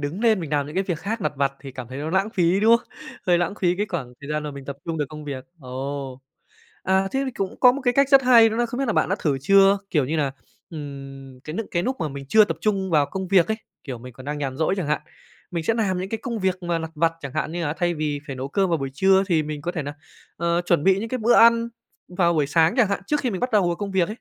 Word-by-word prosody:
đứng 150 Hz, +8 st, -4 dB
nên 220 Hz, -5 st, +3 dB
mình 160 Hz, -, -6 dB
làm 145 Hz, -2 st, 0 dB
những 150 Hz, -, -9 dB
cái 190 Hz, -, +1 dB
việc 175 Hz, -5 st, -2 dB
khác 220 Hz, +3 st, -3 dB
lặt 150 Hz, -, -1 dB
vặt 140 Hz, 0 st, +1 dB
thì 135 Hz, -1 st, -9 dB
cảm 125 Hz, -2 st, -8 dB
thấy 130 Hz, +2 st, -7 dB
nó 155 Hz, +2 st, -3 dB
lãng 195 Hz, +4 st, +1 dB
phí, 180 Hz, -1 st, +2 dB
đúng 230 Hz, +2 st, +6 dB
không? -, -, -14 dB, 0.4 s
Hơi 175 Hz, -1 st, +4 dB
lãng 175 Hz, +3 st, -1 dB
phí 180 Hz, -1 st, +2 dB
cái 205 Hz, -, -1 dB
khoảng 135 Hz, -9 st, -4 dB
thời 145 Hz, +1 st, -8 dB
gian 150 Hz, 0 st, -1 dB
mà 150 Hz, -, -4 dB
mình 140 Hz, -1 st, -9 dB
tập 140 Hz, 0 st, -6 dB
trung 165 Hz, -2 st, -3 dB
được 150 Hz, -, +1 dB
công 150 Hz, 0 st, -9 dB
việc. 135 Hz, -3 st, -6 dB, 0.2 s
Ồ, 135 Hz, 0 st, -5 dB, 0.6 s
à, 190 Hz, 0 st, +2 dB
thế 270 Hz, -, 0 dB
thì 260 Hz, -, -2 dB
cũng 195 Hz, -5 st, -5 dB
có 250 Hz, -1 st, +7 dB
một 280 Hz, -, -4 dB
cái 245 Hz, 0 st, +2 dB
cách 275 Hz, 0 st, +4 dB
rất 275 Hz, -1 st, +6 dB
hay 235 Hz, -3 st, +7 dB
đó 220 Hz, -, -3 dB
là 240 Hz, 0 st, +1 dB
không 245 Hz, +2 st, -6 dB
biết 275 Hz, -, 0 dB
là 225 Hz, -, +1 dB
bạn -, -, +1 dB
đã 195 Hz, -, 0 dB
thử 140 Hz, -4 st, 0 dB
chưa 195 Hz, +4 st, +5 dB
kiểu 150 Hz, -6 st, +2 dB
như 155 Hz, +5 st, -2 dB
nà, 140 Hz, -3 st, 0 dB, 0.4 s
ừm, 135 Hz, -3 st, -9 dB
cái 155 Hz, +4 st, -8 dB
nức 225 Hz, -1 st, -3 dB
cái 170 Hz, 0 st, 0 dB
núc 260 Hz, +4 st, -1 dB
mà 160 Hz, -, -1 dB
mình 140 Hz, -1 st, -7 dB
chưa 215 Hz, +5 st, +6 dB
tập -, -, -3 dB
trung 195 Hz, -3 st, 0 dB
vào 150 Hz, -3 st, +3 dB
công 190 Hz, -1 st, -5 dB
việc 185 Hz, -3 st, +5 dB
ấy, 220 Hz, -, 0 dB, 0.3 s
kiểu, 130 Hz, -5 st, -6 dB
mình 125 Hz, +1 st, -11 dB
còn 130 Hz, +4 st, -13 dB
đang 150 Hz, 0 st, -3 dB
nhàn 135 Hz, -2 st, -3 dB
rỗi 160 Hz, +4 st, +1 dB
chẳng 180 Hz, -, -2 dB
hạn, 150 Hz, +1 st, 0 dB, 0.5 s
mình 170 Hz, -2 st, -3 dB
sẽ 225 Hz, -, +2 dB
làm 195 Hz, -5 st, 0 dB
những 185 Hz, -, -4 dB
cái 225 Hz, -, -3 dB
công 235 Hz, -4 st, -3 dB
việc 185 Hz, -1 st, -1 dB
mà 170 Hz, -1 st, -1 dB
lặt 160 Hz, 0 st, -5 dB
vặt 165 Hz, +2 st, +2 dB
chẳng 140 Hz, -2 st, -7 dB
hạn 155 Hz, +1 st, -2 dB
như 175 Hz, 0 st, -2 dB
là 145 Hz, -, -1 dB
thay 175 Hz, 0 st, -1 dB
vì 150 Hz, -2 st, -2 dB
phải 135 Hz, -, -6 dB
nấu 130 Hz, +2 st, -4 dB
cơm 195 Hz, +5 st, +1 dB
vào 165 Hz, -, +2 dB
buổi 135 Hz, 0 st, -4 dB
trưa 190 Hz, +4 st, +4 dB
thì 165 Hz, -4 st, +2 dB
mình 150 Hz, -1 st, -6 dB
có 175 Hz, +1 st, -3 dB
thể 155 Hz, -, -3 dB
nà, 145 Hz, +1 st, -6 dB, 0.4 s
ờ, 170 Hz, +1 st, +1 dB
chuẩn 170 Hz, -3 st, +2 dB
bị 190 Hz, 0 st, +4 dB
những 225 Hz, -, -4 dB
cái 255 Hz, -, -2 dB
bữa 235 Hz, +1 st, +3 dB
ăn 230 Hz, 0 st, +6 dB, 0.4 s
vào 175 Hz, -1 st, +2 dB
buổi 150 Hz, -2 st, +2 dB
sáng 160 Hz, +3 st, +3 dB
chẳng 230 Hz, -6 st, +4 dB
hạn, 200 Hz, -, -1 dB
trước 295 Hz, -1 st, +1 dB
khi 250 Hz, -, -1 dB
mình 190 Hz, -, -4 dB
bắt 250 Hz, +1 st, -1 dB
đầu 205 Hz, -4 st, +4 dB
vào 170 Hz, -1 st, 0 dB
công 205 Hz, -1 st, -4 dB
việc 190 Hz, -1 st, +1 dB
ấy. 170 Hz, -, +3 dB
170 Hz, 310 wpm, -23 LUFS, 145-200 Hz, 0.6 s, có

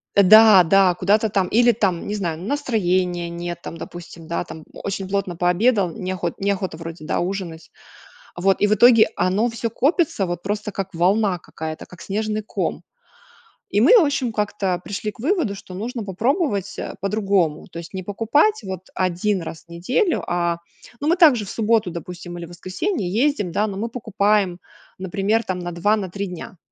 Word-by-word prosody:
Да, 205 Hz, 0 st, +8 dB
да, 185 Hz, +1 st, +4 dB
куда-то 205 Hz, +5 st, +2 dB
там, 195 Hz, -2 st, +1 dB
или, 240 Hz, +2 st, +4 dB
там, 190 Hz, -6 st, -1 dB
не 210 Hz, -, -2 dB
знаю, 170 Hz, -6 st, -3 dB
настроения 185 Hz, -8 st, 0 dB
нет, 175 Hz, 0 st, -5 dB
там, -, -, -7 dB
допустим, 170 Hz, -1 st, -10 dB
да 170 Hz, +1 st, -2 dB
там, 160 Hz, -1 st, -10 dB
очень 195 Hz, -1 st, -5 dB
плотно 195 Hz, -3 st, -1 dB
пообедал 180 Hz, +3 st, +2 dB
не 185 Hz, -4 st, -4 dB
охот 175 Hz, -2 st, -4 dB
не 200 Hz, +1 st, +1 dB
охота 190 Hz, -4 st, -3 dB
вроде 165 Hz, -1 st, -8 dB
да -, -, -1 dB
ужинать. 175 Hz, -3 st, -4 dB, 0.7 s
Вот 190 Hz, +2 st, +1 dB
и 205 Hz, -, +5 dB
в 210 Hz, -, +3 dB
итоге 230 Hz, +1 st, +6 dB
оно 190 Hz, +6 st, +1 dB
всё 230 Hz, 0 st, -3 dB
копится 290 Hz, -, +1 dB
вот 175 Hz, 0 st, -4 dB
просто 210 Hz, +1 st, -3 dB
как 195 Hz, 0 st, -5 dB
волна 185 Hz, +2 st, +2 dB
какая-то, 160 Hz, -1 st, -7 dB
как 180 Hz, -, -14 dB
снежный 215 Hz, +1 st, -2 dB
ком. -, -, -3 dB, 0.9 s
И 205 Hz, -, +1 dB
мы 335 Hz, -, +7 dB
в 410 Hz, -, +6 dB
общем 265 Hz, -5 st, -1 dB
как-то 200 Hz, -4 st, -1 dB
пришли 210 Hz, +1 st, -4 dB
к -, -, -23 dB
выводу, 295 Hz, -, 0 dB
что 190 Hz, -1 st, -11 dB
нужно 230 Hz, +5 st, -4 dB
попробовать, 205 Hz, -, -1 dB
э, -, -, -5 dB
по-другому. 195 Hz, -6 st, 0 dB
То 170 Hz, -, -7 dB
есть 170 Hz, +2 st, -10 dB
не 190 Hz, -1 st, -5 dB
покупать 230 Hz, -, +2 dB
вот 190 Hz, -1 st, -7 dB
один 185 Hz, +2 st, 0 dB
раз 160 Hz, -1 st, -8 dB
в -, -, -40 dB
неделю, 245 Hz, -, 0 dB
а, 170 Hz, -1 st, 0 dB, 0.4 s
ну 290 Hz, -, -2 dB
мы 335 Hz, -, +4 dB
также 295 Hz, -, +5 dB
в -, -, -9 dB
субботу 220 Hz, -4 st, +1 dB
допустим 175 Hz, +1 st, -8 dB
или 170 Hz, -, -6 dB
воскресенье 185 Hz, -, -3 dB
ездим, 220 Hz, -2 st, +1 dB
да. 210 Hz, +4 st, +1 dB
Но 195 Hz, -2 st, -5 dB
мы 220 Hz, +4 st, -2 dB
покупаем 205 Hz, -5 st, 0 dB, 0.4 s
например 195 Hz, +4 st, 0 dB
там 185 Hz, -1 st, -3 dB
на 175 Hz, 0 st, -5 dB
2, 175 Hz, +5 st, +2 dB
на 195 Hz, -4 st, -4 dB
3 200 Hz, +2 st, -3 dB
дня, 180 Hz, +3 st, -9 dB
195 Hz, 185 wpm, -22 LUFS, 175-220 Hz, 0.9 s, Да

